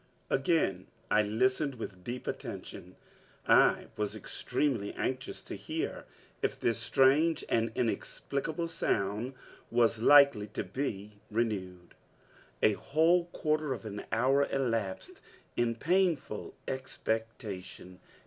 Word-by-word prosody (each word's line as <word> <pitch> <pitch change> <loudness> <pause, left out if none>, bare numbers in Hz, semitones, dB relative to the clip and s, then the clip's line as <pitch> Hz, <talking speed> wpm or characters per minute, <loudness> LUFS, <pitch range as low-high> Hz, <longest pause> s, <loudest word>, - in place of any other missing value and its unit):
Again 135 - +1 0.2
I 105 - +5
listened 130 +7 +1
with 95 -6 -7
deep 120 +5 -5
attention. - - -6 0.5
I - - +5
was 105 -1 -2
extremely 120 -9 -2
anxious 130 0 -3
to - - -8
hear - - -4 0.4
if - - -1
this 115 -1 +1
strange 135 +7 +3
and 115 0 +1
inexplicable 140 +7 -2
sound 110 -5 -1 0.3
was 115 -1 +3
likely 140 -6 +7
to - - 0
be 105 -6 -4
renewed! 95 -6 -2 0.7
A 110 - +7
whole 160 - +3
quarter 155 -4 -1
of 115 - -8
an 105 -1 -5
hour 135 +5 +3
elapsed 115 -8 -2 0.3
in 120 -1 +1
painful 165 - 0
expectation. 110 -7 -4
120 Hz, 110 wpm, -31 LUFS, 105-140 Hz, 0.7 s, likely